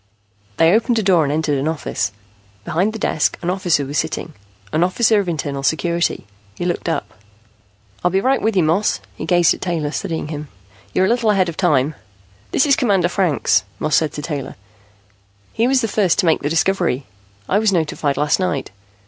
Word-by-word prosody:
They 165 +2 +5
opened 230 +2 +2
a 220 - +1
door 180 -4 +4
and 140 - -1
entered 150 -2 0
an 140 - -1
office. 160 -1 -2 0.5
Behind 185 +7 0
the 225 - -6
desk, 155 -7 0
an 175 - 0
officer 175 -6 +1
was 145 +2 -1
sitting, 160 0 -3 0.4
an 160 - +3
officer 215 +4 +3
of 195 -3 -2
Internal 145 -4 -3
Security. 170 +4 0 0.3
He 175 - -4
looked 175 -1 -2
up. 110 -9 -3 0.9
"I'll 180 - +3
be 190 +2 +1
right 265 +6 +1
with 220 -1 0
you, 185 - +4
Moss." 170 +7 +1 0.2
He - - -6
gazed 175 -2 +4
at - - -10
Taylor 165 -5 -2
studying 160 -1 -3
him. 150 -1 -5 0.4
"You're 185 - +2
a - - +1
little 235 -1 +2
ahead 190 -4 +3
of 165 - -6
time." 145 0 +2 0.6
"This - - +2
is 280 -2 +4
Commander 195 -8 +2
Franks," 165 - +2
Moss 155 +4 0
said 155 -3 +2
to 150 - -6
Taylor. 145 -3 -5 1.0
"He 230 - +1
was 265 0 +3
the 225 - 0
first 195 -5 +1
to - - +2
make 160 - +3
the 145 - -1
discovery. 165 -5 +1 0.4
I 200 - +2
was 215 -1 +2
notified 155 -5 0
last 150 +4 +2
night." 180 - -2
170 Hz, 195 wpm, -19 LUFS, 150-195 Hz, 1.0 s, They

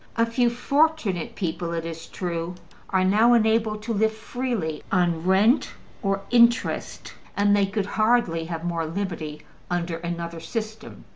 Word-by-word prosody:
A 230 - +3
few 235 +1 +2
fortunate 240 - 0
people, 170 -3 -3
it 165 -1 -3
is 165 -1 -7
true, 170 -1 -4 0.3
are 185 -1 +2
now 220 +6 +5
enabled 220 -1 +2
to 230 +1 -2
live 220 +1 +2
freely 220 -7 -3
on 175 -3 +1
rent 205 +7 +3 0.3
or 195 -2 0
interest, 235 0 +2 0.2
and 205 0 +4
they 200 -1 +3
could 200 0 -2
hardly 215 -6 +1
have 165 -1 -5
more 165 -2 -1
liberty 165 -4 -4 0.3
under 175 -1 -1
another 170 0 -5
system. 215 +6 -6
195 Hz, 145 wpm, -25 LUFS, 170-230 Hz, 0.3 s, now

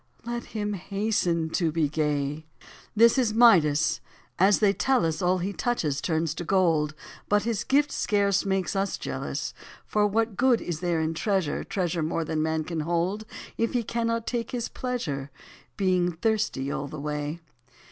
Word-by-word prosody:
Let 235 0 -4
him 210 0 -1
hasten 190 -4 -1
to 165 -3 +1
be 155 -1 +1
gay. 150 0 -1 0.5
This 230 +4 +6
is 225 -4 +1
Midas: 165 -11 +5 0.4
as 195 +3 +5
they 205 -2 +3
tell 260 -2 +2
us, 160 +2 -1
All 180 +1 +2
he 185 +3 -3
touches 155 - -1
turns 160 -2 0
to 175 - -5
gold, 165 -5 +2 0.3
But 205 0 +3
his 225 -2 -1
gift 290 +2 +2
scarce 200 -2 +1
makes 190 -1 -1
us 195 0 0
jealous; - - -4 0.3
For 210 -1 +2
what 225 0 0
good 250 -1 +4
is 170 -3 -4
there 175 -3 0
in 160 +1 -1
treasure. 190 -2 0
Treasure 175 -3 -2
more 160 +1 -1
than 155 -1 -1
man 160 0 0
can 165 0 -4
hold. 175 +7 -1 0.3
If 230 - +1
he 245 -2 +1
cannot 230 0 -1
take 235 -2 -2
his 240 -2 -3
pleasure, 155 - -3 0.5
Being 180 -3 +2
thirsty 165 -8 -1
all 140 - -3
the 155 +1 -7
way 150 +2 -3
185 Hz, 165 wpm, -26 LUFS, 160-220 Hz, 0.5 s, This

